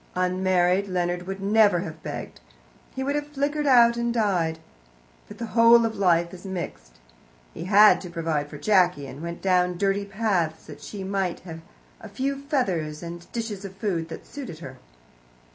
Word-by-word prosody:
Unmarried, 185 +1 +1
Leonard 180 -1 -2
would 195 0 -5
never 205 -3 +4
have 160 -3 -8
begged; - - -7 0.6
he 265 - -2
would 280 +1 -1
have 295 0 -2
flickered 295 +1 -1
out 235 -3 +6
and 235 0 0
died. 185 -8 0 0.7
But - - -11
the 235 - -4
whole 230 0 +6
of 225 - -2
life 175 -3 +2
is 180 - -11
mixed. 170 - -6 0.6
He - - -7
had 210 +2 +6
to 180 - -8
provide 160 -4 -2
for 145 - -9
Jacky, 180 -5 +2
and 135 +2 -9
went 170 0 -6
down 180 -2 +2
dirty 200 +1 0
paths 195 -6 -1
that 145 -1 -11
she 195 +5 -7
might 190 -2 -2
have 165 -2 -9 0.4
a 220 - -10
few 275 +6 -3
feathers 180 - -2
and 170 0 -9
dishes 225 -4 -4
of 195 -1 -8
food 175 -5 -2
that - - -8
suited 260 - -8
her. 130 -5 -10
190 Hz, 175 wpm, -25 LUFS, 170-220 Hz, 0.7 s, out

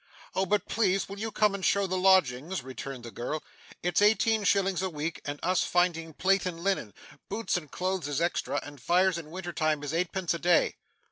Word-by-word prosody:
'Oh, 190 0 0
but 205 +2 +1
please 195 -3 +1
will 200 +1 -8
you 220 +1 -3
come 210 -1 +2
and 200 -1 -5
show 200 +2 +3
the 185 0 -2
lodgings,' 185 -4 +3
returned 130 -1 -7
the 115 - -8
girl; 135 +7 -4 0.4
'It's 175 +1 +2
eighteen 220 +1 +4
shillings 195 -2 +2
a 190 - -1
week 160 0 -4
and 145 0 -4
us 185 +1 +2
finding 165 -2 +1
plate 195 0 +2
and 170 -2 -5
linen. 190 - -1 0.3
Boots 225 -2 -1
and 160 -5 -3
clothes 185 -2 -2
is 145 0 -1
extra, 170 +1 0
and 145 -3 -11
fires 180 +4 +3
in 155 -2 -10
winter 175 +1 -6
time 155 -2 0
is 145 +1 -4
eightpence 175 +1 0
a 170 - -4
day. 175 0 +3
180 Hz, 205 wpm, -29 LUFS, 155-190 Hz, 0.4 s, eighteen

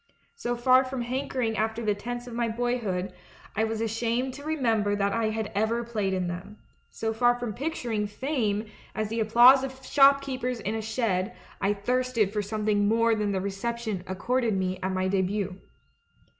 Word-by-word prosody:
So 245 - -2
far 255 +2 +5
from 260 -1 -4
hankering 250 -2 -2
after 220 +2 -1
the 210 - +3
tents 240 +4 -5
of 245 - -9
my 235 0 0
boyhood, 225 -6 -1 0.4
I 220 - +2
was 225 0 -3
ashamed 230 +3 -1
to 285 +2 -9
remember 230 -10 +1
that 200 0 0
I 230 -1 +1
had 220 -1 -3
ever 220 +3 +1
played 215 -4 -2
in 185 -1 0
them; 180 +4 -6 0.3
so 225 0 -3
far 245 +2 +3
from 240 -3 -3
picturing 240 -6 -2
Fame 220 -2 -1 0.3
as 215 -1 -1
the 225 +1 -2
applause 240 +5 +7
of 265 0 -7
shopkeepers 275 -3 +3
in 210 - -2
a 225 - -2
shed, 220 -4 -1 0.3
I 200 +1 +2
thirsted 240 -1 0
for 210 - 0
something 210 0 0
more 230 +1 +3
than 210 -2 0
the 190 -1 -1
reception 205 0 -3
accorded 225 +3 0
me 185 0 -1
at 190 - -1
mv 185 0 0
debut. 195 0 -1
225 Hz, 175 wpm, -27 LUFS, 205-245 Hz, 0.4 s, applause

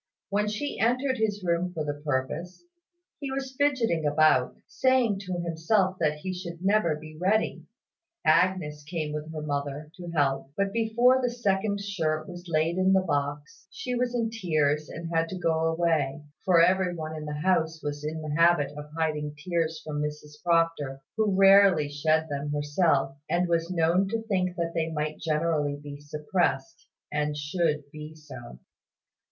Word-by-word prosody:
When 210 +1 +1
she 215 +8 -3
entered 255 +3 +1
his 205 -2 0
room 175 +1 0
for 155 -2 -2
the 145 - -1
purpose, 150 - -3 0.6
he 280 - -4
was 270 0 -4
fidgeting 255 - +1
about, 150 -3 +3
saying 255 -6 +2
to 185 - -2
himself 175 +3 +1
that 150 -2 +1
he 185 +2 -3
should 175 -1 -7
never 195 -6 +3
be 155 +1 -11
ready. 210 +4 +1 0.6
Agnes 160 -2 +2
came 155 -1 -4
with 150 +1 -5
her 155 -1 -5
mother, 145 +1 -3
to 175 -1 -8
help: 135 -4 0
but 200 0 0
before 240 +3 +3
the 250 - +1
second 200 -3 0
shirt 160 -6 -2
was 175 0 -9
laid 165 +1 +1
in 190 +1 +4
the 190 - +5
box, 145 0 -3
she 250 +5 -5
was 245 0 0
in 230 -2 0
tears 155 -8 0
and 170 0 -6
had 165 0 +2
to 190 - -5
go 165 -2 +1
away; 160 -4 0 0.2
for 175 -3 +6
every 180 0 +2
one 160 -1 -5
in 155 -1 -6
the 150 - -4
house 165 -2 +1
was 145 0 -4
in 155 +1 -4
the 150 -1 -3
habit 165 -3 +4
of 150 0 -8
hiding 150 -2 -1
tears 165 -1 -1
from 150 -1 -3
Mrs 150 0 -6
Proctor, 165 -6 +1
who 215 -3 +1
rarely 195 -5 +6
shed 155 +2 +1
them 145 0 -3
herself, 145 -2 +1
and 175 +1 +1
was 170 0 0
known 175 +2 +2
to 225 +2 -2
think 185 -4 -1
that 170 -2 -2
they 165 -1 0
might 155 -1 -3
generally 155 -2 0
be 145 0 -9
suppressed, 150 0 -2 0.2
and 150 0 -1
should 150 0 0
be 155 +1 -9
so. 130 - -11
165 Hz, 170 wpm, -27 LUFS, 150-190 Hz, 0.6 s, for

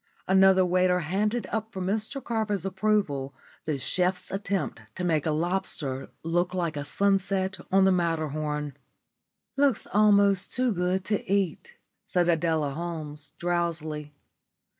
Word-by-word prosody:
Another 190 0 +5
waiter 180 0 +2
handed 210 +8 0
up 220 +1 -2
for 190 - -6
Mr 215 +8 -2
Carver's 215 -5 -1
approval 190 -9 0 0.3
the 155 -3 -1
chef's 180 +7 -1
attempt 195 - -2
to 180 - -4
make 160 -4 +1
a - - +2
lobster 155 -5 -1
look 175 +2 0
like 170 -4 -1
a 145 - -3
sunset 195 +2 0
on 190 0 +5
the 190 - +5
Matterhorn. 155 -4 -1 0.8
"Looks 275 -5 +2
almost 200 -2 +4
too 255 -1 +2
good 180 0 0
to 210 -2 0
eat," 200 - -1 0.3
said 175 -1 +1
Adela 160 -3 +1
Holmes, 150 -2 -5
drowsily. 160 -4 -2
180 Hz, 130 wpm, -27 LUFS, 160-200 Hz, 0.8 s, Another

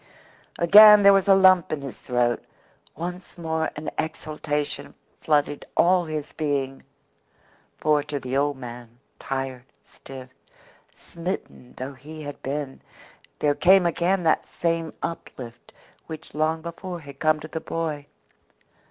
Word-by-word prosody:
Again 210 +4 +9
there 200 0 +8
was 195 0 +3
a 195 - +7
lump 185 -2 +5
in 155 -2 -2
his 135 - -7
throat 120 -1 0 0.5
once 180 +3 -7
more 160 -1 -1
an 150 +1 -5
exultation 150 -2 -3 0.2
flooded 145 -1 +1
all 180 0 +4
his 155 -2 -5
being. 140 -3 -2 1.0
For 150 -1 +2
to 145 -1 -4
the 130 0 -4
old 145 0 +1
man 120 -2 -10 0.2
tired, 135 -2 -4 0.2
stiff, 130 -1 -11 0.7
smitten 170 -7 -7
though 130 +2 -5
he 155 +4 -10
had 145 0 -8
been, 140 0 -4 0.6
there 145 -1 +2
came 180 +5 +5
again 175 +2 +1
that 160 - +2
same 165 -1 -1
uplift 120 -7 -7 0.4
which 160 -1 -9
long 155 +1 0
before 170 +1 -6
had 140 -2 -12
come 155 -1 +2
to 155 - -8
the 160 +1 -5
boy. 155 -4 -4
155 Hz, 135 wpm, -24 LUFS, 140-170 Hz, 1.0 s, Again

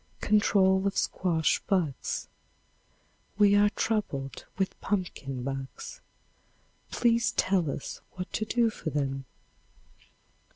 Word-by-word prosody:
Control 195 -2 +3
of 195 - -2
Squash 165 -4 +1
Bugs. 165 - 0 1.1
We 205 -1 +6
are 205 0 +6
troubled 205 -13 -2
with 190 -1 -2
pumpkin 140 -10 -2
bugs. 135 0 -6 0.9
Please 235 -1 +2
tell 185 -5 +2
us 140 - -5
what 185 0 -6
to - - 0
do 230 +1 +2
for 165 - -5
them. 135 -2 -2
190 Hz, 100 wpm, -29 LUFS, 140-205 Hz, 1.1 s, We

